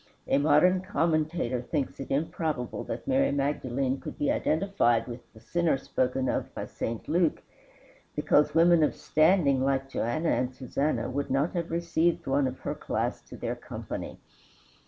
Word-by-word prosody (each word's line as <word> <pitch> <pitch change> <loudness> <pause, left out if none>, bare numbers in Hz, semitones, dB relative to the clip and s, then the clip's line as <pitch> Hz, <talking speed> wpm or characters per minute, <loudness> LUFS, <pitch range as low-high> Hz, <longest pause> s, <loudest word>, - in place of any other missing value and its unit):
A 135 - +3
modern 160 +5 +4
commentator 160 -8 0
thinks 140 +2 -3
it 135 - -6
improbable 150 -2 -2
that - - -6
Mary 275 +1 +3
Magdalene 135 -2 -1
could - - -8
be 145 - +1
identified 155 - +1
with 120 0 -9
the 110 - -16
"sinner" 165 +5 +1
spoken 130 0 -1
of - - -1
by - - -4
St. 115 -1 -5
Luke, 170 0 +1 0.7
because 150 - +3
women 170 0 +6
of 150 - +2
standing 155 -5 +3
like 135 0 0
Joanna 155 +6 -1
and 130 0 0
Susanna 140 +3 -1
would 140 +2 -3
not 135 +5 +1
have 170 -2 -2
received 170 0 0
one 135 0 +2
of 130 0 -6
her - - -2
class - - -2
to - - -9
their - - -3
company. - - -7
145 Hz, 155 wpm, -28 LUFS, 130-165 Hz, 0.7 s, women